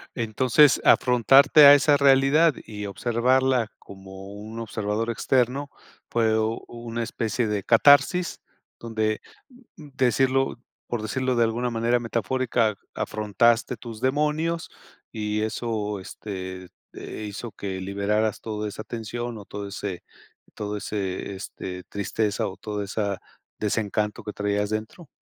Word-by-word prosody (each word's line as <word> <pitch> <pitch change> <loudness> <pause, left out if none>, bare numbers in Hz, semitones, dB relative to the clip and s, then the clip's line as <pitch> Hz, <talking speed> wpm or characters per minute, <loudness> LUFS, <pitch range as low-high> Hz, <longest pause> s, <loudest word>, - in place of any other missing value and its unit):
Entonces, 125 +5 +4
afrontarte 135 +4 +6
a 140 - +11
esa 145 +1 +5
realidad 140 +3 +5
y 105 -1 -6
observarla 120 +3 +1
como 95 0 -11
un 110 +2 -8
observador 110 0 -2
externo 130 +4 0 0.4
fue 110 -2 +2 0.3
una 120 0 -6
especie 115 +1 -2
de 105 -2 -2
catarsis 145 - +4 0.4
donde, 110 -2 -2 0.6
mm, 155 -3 -11
decirlo, 135 +1 +2 0.3
por 120 -2 -3
decirlo 130 +3 -1
de 120 - +4
alguna 120 +2 -1
manera 115 +1 +1
metafórica, 115 -1 0 0.2
¿afrontaste 115 +3 +1
tus 115 0 -9
demonios 150 +5 0 0.4
y 105 -1 -2
eso? 110 -2 -3
Este, 95 -1 -7 0.2
eh, 110 - -7
¿hizo 105 +3 -7
que 95 -2 -5
liberaras 100 +2 -1
toda 105 -1 -4
esa 105 +1 -7
tensión 120 +1 -5
o 105 - -10
todo 100 0 -6
ese, 100 -2 -5 0.5
todo 105 0 -4
ese, 100 -2 -4
este, 90 -1 -7
tristeza 100 +1 -2
o 95 - -8
todo 105 -2 -4
esa 100 -1 -2 0.4
desencanto 105 0 -1
que 105 0 -6
traías 105 0 -1
dentro? 110 +10 -5
110 Hz, 125 wpm, -25 LUFS, 105-125 Hz, 0.6 s, a